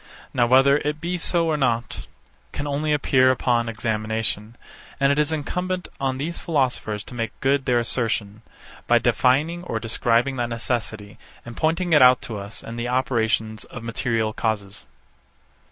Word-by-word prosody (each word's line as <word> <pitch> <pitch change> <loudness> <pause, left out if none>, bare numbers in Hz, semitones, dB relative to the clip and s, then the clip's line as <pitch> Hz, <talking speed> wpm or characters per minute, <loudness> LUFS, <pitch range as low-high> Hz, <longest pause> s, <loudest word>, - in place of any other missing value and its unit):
Now 120 -1 +3
whether 135 +3 +5
it 150 +1 -3
be 175 +2 -3
so 170 0 +2
or 155 -2 +1
not, 120 -5 -1 0.4
can 145 - -4
only 145 +2 -1
appear 130 -3 +3
upon 120 -2 +1
examination; 110 0 -2 0.4
and 140 0 +4
it 140 - +1
is 150 +1 +1
incumbent 180 +4 -3
on 135 -1 -1
these 160 +5 -3
philosophers 125 -9 -1
to - - -12
make 115 -2 -4
good 135 0 +1
their 125 -1 +3
assertion, 110 -3 -2 0.5
by - - +5
defining 155 +7 +2
or 115 -10 -3
describing 120 +3 +1
that 120 -1 -1
necessity, 115 -3 -3 0.3
and 120 -1 -9
pointing 165 +2 0
it 150 - +6
out 125 0 +7
to 110 -3 -5
us 100 +2 -7
in 115 - -7
the 120 +1 -3
operations 110 -3 0
of 125 - -9
material 115 -1 -1
causes. 105 -4 -3
125 Hz, 160 wpm, -23 LUFS, 115-145 Hz, 0.5 s, out